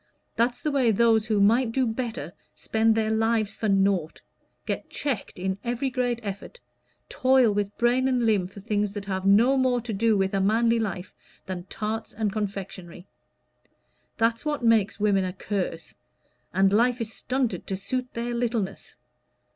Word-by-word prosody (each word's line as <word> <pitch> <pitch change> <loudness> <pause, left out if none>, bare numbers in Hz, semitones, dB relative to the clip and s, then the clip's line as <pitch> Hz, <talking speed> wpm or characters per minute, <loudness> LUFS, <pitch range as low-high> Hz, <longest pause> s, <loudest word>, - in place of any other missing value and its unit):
That's 240 +1 +1
the 300 - -2
way 265 -4 +2
those 225 0 +3
who 215 -2 +1
might 225 +4 +3
do 260 +2 +1
better 225 - -4 0.2
spend 220 0 +1
their 220 -1 +1
lives 220 -1 +1
for 220 - -2
nought 195 -4 +1 0.5
get - - -4
checked 265 -8 -3
in 190 +1 -2
every 245 +3 -2
great 245 -2 -1
effort 200 - -7 0.5
toil 260 -4 +3
with 205 0 -2
brain 250 +2 +2
and 250 -3 +1
limb 205 -5 +2
for 195 +2 -12
things 210 -1 -1
that 205 -1 -6
have 190 -1 -2
no 235 +7 +5
more 255 -2 +2
to 230 -1 -5
do 220 +1 +2
with 195 0 0
a 195 - +1
manly 230 +3 +3
life 190 -4 -4 0.3
than 180 -2 -5
tarts 220 +2 -4
and 210 -2 -1
confectionery. 195 -4 -5 1.1
That's 230 0 +1
what 295 -4 -2
makes 220 -4 +3
women 205 -2 +2
a 185 -1 -3
curse; 185 -5 -4 0.6
and 195 +1 +3
life 245 +3 +3
is 225 -1 -4
stunted 255 -2 -2
to 190 - -2
suit 250 +6 -3
their 235 +1 -3
littleness. 230 -5 -3
220 Hz, 165 wpm, -26 LUFS, 195-240 Hz, 1.1 s, no